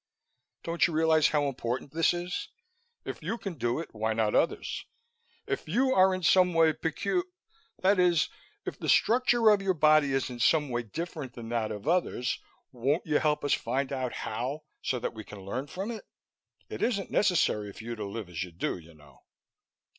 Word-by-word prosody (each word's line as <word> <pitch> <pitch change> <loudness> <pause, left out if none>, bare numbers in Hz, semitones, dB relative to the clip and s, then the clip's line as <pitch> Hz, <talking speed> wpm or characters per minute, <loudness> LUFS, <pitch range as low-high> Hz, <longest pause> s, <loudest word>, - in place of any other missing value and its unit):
Don't 170 0 +2
you 170 - -5
realize 160 -1 +4
how 150 -1 +1
important 125 0 -3
this 165 0 +3
is? 175 +1 -3 0.6
If - - -6
you 230 - -2
can 195 -5 -5
do 120 -3 -1
it, 165 - -7
why 110 0 -1
not 110 -1 +1
others? 165 - 0 0.6
If 400 - -3
you 260 +8 +2
are 190 -2 +5
in 185 - -6
some 180 0 +4
way 160 -1 +5
pecu 185 - -1 0.6
that 195 0 +4
is, 175 -3 +4 0.4
if - - -5
the - - -3
structure 240 -2 +4
of 205 -1 +3
your 190 -1 +1
body 155 -2 +5
is 135 -1 0
in 120 - -7
some 150 +4 +3
way 120 -1 -1
different 145 - -6
from 115 -2 -8
that 115 -2 -1
of 105 +5 -7
others, 165 -7 +1 0.3
won't 135 +6 0
you 155 -3 +2
help 150 -1 +1
us 145 - +3
find 135 +4 -1
out 130 -2 -2
how 130 +8 -3 0.2
so 130 - -1
that 120 - -3
we 110 - -8
can 105 -1 -11
learn 130 +8 -3
from 195 +8 -4
it? 225 - -7 0.6
It - - -7
isn't 200 -5 0
necessary 165 - +2
for 110 - -11
you 120 +1 -4
to 110 - -5
live 100 0 -5
as 85 -3 -5
you 90 - -9
do, 85 +2 -3
you 80 -1 -16
know." 75 -2 -19
150 Hz, 195 wpm, -29 LUFS, 115-180 Hz, 0.6 s, are